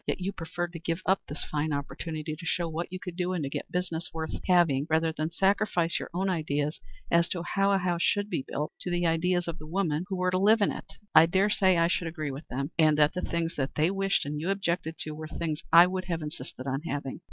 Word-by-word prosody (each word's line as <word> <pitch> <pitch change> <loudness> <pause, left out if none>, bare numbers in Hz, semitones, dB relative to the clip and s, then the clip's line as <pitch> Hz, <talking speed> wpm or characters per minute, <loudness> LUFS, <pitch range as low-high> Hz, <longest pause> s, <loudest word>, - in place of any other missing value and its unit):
Yet - - -1
you 185 +2 -2
preferred 175 +1 -4
to 165 - -6
give 165 +2 -3
up 190 +1 +3
this 145 - -5
fine 155 +1 -1
opportunity 155 +2 -4
to 165 - -12
show 170 +1 0
what 165 +2 -4
you 185 - -5
could 180 -2 -7
do 180 0 -1
and 170 -4 -1
to 140 - -3
get - - -5
business 175 -2 -2
worth 160 -1 -4 0.2
having 165 -6 +4
rather 160 +1 +2
than 155 +1 -1
sacrifice 190 -2 +1
your - - -6
own 185 +3 -1
ideas 150 -4 -1 0.3
as 170 0 +4
to 175 -2 -2
how 195 +2 +1
a 195 - +4
house 175 -2 0
should 205 +3 +2
be 140 - -2
built 150 +1 -3
to - - -3
the 175 0 0
ideas 175 +2 +1
of 170 0 -4
the 155 - -10
women 165 -2 0
who 190 - -2
were 180 0 +1
to 185 - +1
live 215 +3 +5
in 205 - +3
it. - - -8 0.2
I 165 - +8
dare 195 +4 +2
say 190 -3 +4
I 170 0 +4
should 175 -1 0
agree 155 -3 -4
with 140 +4 -8
them, 140 +3 -3
and 155 -2 +5
that 150 0 +4
the 180 - -2
things 165 0 -2
which 135 -1 0
they 155 +4 +3
wished 195 -3 +1
and 150 +1 -3
you 170 - -2
objected 170 -4 -1
to 155 - -3
were 155 +1 -6
things 155 -1 -3
I 170 +2 +10
would 185 0 -3
have 165 -3 -2
insisted 150 -3 -7
on 135 +1 -1
having." 145 -4 -4
170 Hz, 255 wpm, -28 LUFS, 155-180 Hz, 0.3 s, I